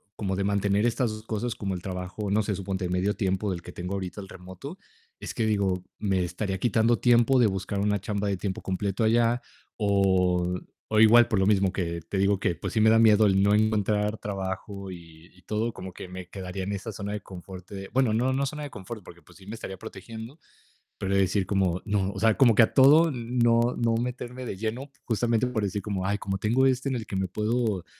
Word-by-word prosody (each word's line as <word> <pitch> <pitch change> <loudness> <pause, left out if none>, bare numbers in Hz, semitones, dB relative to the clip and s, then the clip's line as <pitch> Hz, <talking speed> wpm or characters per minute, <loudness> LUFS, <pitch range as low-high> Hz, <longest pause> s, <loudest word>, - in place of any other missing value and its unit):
como 95 -2 -2
de 100 - -1
mantener 100 +1 +1
estas 120 0 +1
2 110 0 -7
cosas 115 +1 -3
como 95 -2 -3
el 90 - -6
trabajo, 95 +2 -4
no 105 - +3
sé, 105 -2 -2
suponte 95 -1 -3
medio 90 +3 +1
tiempo 95 0 -1
del 85 -2 -4
que - - -10
tengo 90 +2 -5
ahorita 95 +1 -5
el 95 - -11
remoto, 95 - -9 0.4
es - - -6
que 115 - 0
digo, 100 -4 0 0.2
me 95 -3 +1
estaría 95 +3 -3
quitando 115 +2 +2
tiempo 120 +2 +4
de 120 - +5
buscar 95 +1 -3
una 105 0 +1
chamba 100 +1 -2
de 100 - -1
tiempo 95 0 -4
completo 100 +2 -2
allá, 115 +2 +3 0.4
o 90 -3 +2 0.3
o 110 - +2
igual 115 +2 +7
por 110 -5 +1
lo 95 - +2
mismo 100 -2 +3
que 85 -4 -2
te 95 - -2
digo 100 0 +2
que 90 - +1
pues 85 - -5
sí, 110 - 0
me 110 +1 +5
da 115 - +5
miedo 110 -1 +6
el 95 -1 +3
no 100 +1 +4
encontrar 105 0 +1
trabajo 95 0 -5
y 85 -1 -13
y 90 - -20
todo, 110 +5 -2
como 95 0 -8
que - - -8
me 90 0 -9
quedaría 95 0 -6
en 100 - -3
esa 100 +3 -5
zona 100 0 -5
de 105 - -4
confort 95 0 -10
de, 95 -1 -7
bueno, 130 -4 +2
no 125 +4 +1
no 140 +1 0
zona 150 +2 -5
de 145 - -5
confort, 105 -1 -8
porque, 85 0 -14
pues - - -18
sí, 95 - -16
me 110 - -5
estaría 95 -4 -7
protegiendo, 115 - -9 0.6
pero 100 0 -2
de 100 - +4
decir 95 0 +1
como 95 -2 +1
no, 100 -2 0
o 100 - -7
sea, 110 +1 +4
como 120 -5 +5
que 115 - +7
a - - 0
todo 150 +5 +6
no 120 -1 +1
no 115 -1 +1
meterme 125 +1 -4
de 95 - -5
lleno 115 +7 -4 0.2
justamente 115 +1 +1
por 125 -3 -1
decir 100 0 -2
como, 95 -3 -2
ay, 100 +1 0
como 95 -1 -3
tengo 120 +6 +2
este 130 +1 +1
en 130 - -1
el 115 -3 -4
que 100 - -6
me 95 0 0
puedo, 105 -1 -1
100 Hz, 230 wpm, -27 LUFS, 95-115 Hz, 0.6 s, igual